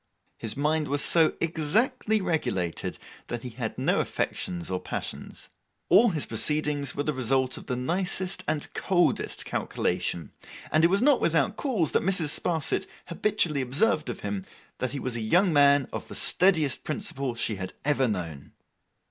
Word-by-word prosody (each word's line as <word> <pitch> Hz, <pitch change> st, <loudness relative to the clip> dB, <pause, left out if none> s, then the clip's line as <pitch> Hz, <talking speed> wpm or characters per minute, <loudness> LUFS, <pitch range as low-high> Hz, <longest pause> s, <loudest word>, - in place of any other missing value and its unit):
His 115 Hz, +3 st, -1 dB
mind 150 Hz, +1 st, +1 dB
was 145 Hz, 0 st, 0 dB
so 165 Hz, -2 st, +4 dB
exactly 215 Hz, -, +1 dB
regulated, 95 Hz, -, -2 dB, 0.3 s
that 120 Hz, -1 st, -5 dB
he 125 Hz, -, -5 dB
had 115 Hz, -1 st, -5 dB
no -, -, +1 dB
affections 90 Hz, 0 st, -3 dB
or 90 Hz, -, -1 dB
passions. -, -, -6 dB, 0.4 s
All 235 Hz, +2 st, +6 dB
his 160 Hz, -6 st, -1 dB
proceedings 150 Hz, -2 st, +1 dB
were 145 Hz, -, -1 dB
the 150 Hz, -, -1 dB
result 130 Hz, 0 st, +1 dB
of -, -, -10 dB
the 125 Hz, -, -1 dB
nicest 180 Hz, +7 st, -1 dB
and 150 Hz, -2 st, -2 dB
coldest 175 Hz, -2 st, 0 dB
calculation; 85 Hz, -4 st, -2 dB, 0.4 s
and 155 Hz, -, +3 dB
it 170 Hz, -, +6 dB
was 195 Hz, +5 st, +2 dB
not 285 Hz, -2 st, +4 dB
without 160 Hz, -4 st, +2 dB
cause 220 Hz, -, -1 dB
that -, -, +2 dB
Mrs. 180 Hz, -4 st, +1 dB
Sparsit 165 Hz, +4 st, 0 dB, 0.2 s
habitually 170 Hz, -5 st, +1 dB
observed 145 Hz, -, +1 dB
of 120 Hz, -, -5 dB
him, 100 Hz, -2 st, -3 dB, 0.4 s
that 130 Hz, -, -2 dB
he 140 Hz, -, -3 dB
was 125 Hz, -2 st, -3 dB
a 115 Hz, -, -3 dB
young 175 Hz, -, +3 dB
man 140 Hz, -2 st, +5 dB
of -, -, -5 dB
the -, -, -9 dB
steadiest 160 Hz, -7 st, +3 dB
principle 140 Hz, -, -3 dB
she 110 Hz, -3 st, -1 dB
had 95 Hz, -1 st, -6 dB
ever 140 Hz, -3 st, +2 dB
known. 85 Hz, -, -5 dB
150 Hz, 165 wpm, -27 LUFS, 125-175 Hz, 0.4 s, All